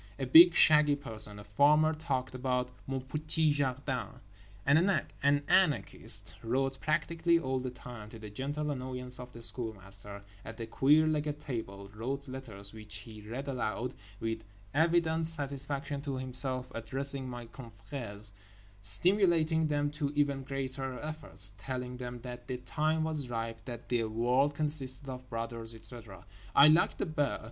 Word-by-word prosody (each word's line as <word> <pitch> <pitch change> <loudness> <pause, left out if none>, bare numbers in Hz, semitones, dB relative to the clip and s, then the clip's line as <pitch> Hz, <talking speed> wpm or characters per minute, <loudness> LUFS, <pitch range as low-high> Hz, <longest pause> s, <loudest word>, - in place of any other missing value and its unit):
A 135 - -3
big, 165 +6 +8
shaggy 150 -2 +6
person, 110 -7 -1
a 105 - -10
farmer, 150 +9 +3
talked 140 -5 -3
about 125 -1 -2 0.2
"mon 135 -1 -3
petit 155 +3 0
jardin," 135 -2 -2 0.6
an 140 +3 +5 0.7
anarchist, 185 -6 +2
wrote 135 +3 -1
practically 165 +2 +1
all 130 -5 -2
the 130 0 -4
time 120 -3 -10
(to 115 - -11
the 110 -2 -10
gentle 145 +6 -3
annoyance 125 -2 -3
of 125 0 -9
The 115 -1 -6
Schoolmaster) 100 -4 -2 0.2
at 115 - -9
the 115 - -5
queer 145 +7 +3
legged 150 -1 -1
table; 105 -9 -6
wrote 135 +6 -5
letters 115 -7 -6
(which 105 -1 -9
he 105 +1 -9
read 120 +7 -7
aloud 125 -1 -3 0.3
with 115 0 -3 0.3
evident 160 +1 +2
satisfaction 140 -2 -3
to 140 -2 -4
himself) 130 0 0
addressing 135 +3 0
"my 120 -1 -7
confrères," 110 -2 +2 0.5
stimulating 160 - +5
them 145 -1 0
to 145 -1 -3
even 140 -2 +1
greater 135 -1 -4
efforts, 150 -11 +2
telling 125 +1 -5
them 125 -1 -7
that 120 -1 -9
the 130 - -3
time 155 +5 -1
was 155 -5 -2
ripe, 115 -1 -4
that 120 -2 -8
the 120 -2 +1
world 125 +6 +1
consisted 145 -3 0
of 130 -1 -8
brothers, 115 0 -5
etc. 110 -2 -9 0.3
I 145 +2 +8
liked 160 +3 +3
The - - -1
Bear. 150 -5 -1
130 Hz, 150 wpm, -31 LUFS, 115-145 Hz, 0.7 s, big